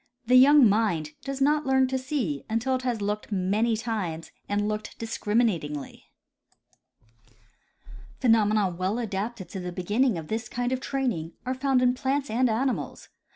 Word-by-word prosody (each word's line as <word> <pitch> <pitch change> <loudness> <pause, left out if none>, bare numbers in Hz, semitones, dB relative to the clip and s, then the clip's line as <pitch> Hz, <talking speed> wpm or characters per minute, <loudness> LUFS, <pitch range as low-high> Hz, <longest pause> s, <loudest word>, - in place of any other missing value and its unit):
The 250 +2 +4
young 275 0 +8
mind 195 -8 +1
does 275 0 -4
not 295 +1 +2
learn 265 0 +4
to 265 - 0
see 255 - -2
until 230 +4 0
it 255 - 0
has 240 -5 -2
looked 210 +2 -3
many 210 +4 +1
times 200 -8 -4 0.2
and 205 +1 0
looked 215 0 -4
discriminatingly. 210 - -2 2.1
Phenomena 215 -4 +3
well 185 +5 -2
adapted 210 -3 -4
to 190 - -6
the 180 0 -5
beginning 205 +5 +1
of 160 -2 -7
this 220 +1 -3
kind 245 +1 -2
of 260 - 0
training 245 - -2
are 255 - -1
found 260 -1 +1
in 250 0 +4
plants 270 +1 -1
and 245 +2 +2
animals. 250 +4 -2
225 Hz, 155 wpm, -26 LUFS, 200-255 Hz, 2.1 s, young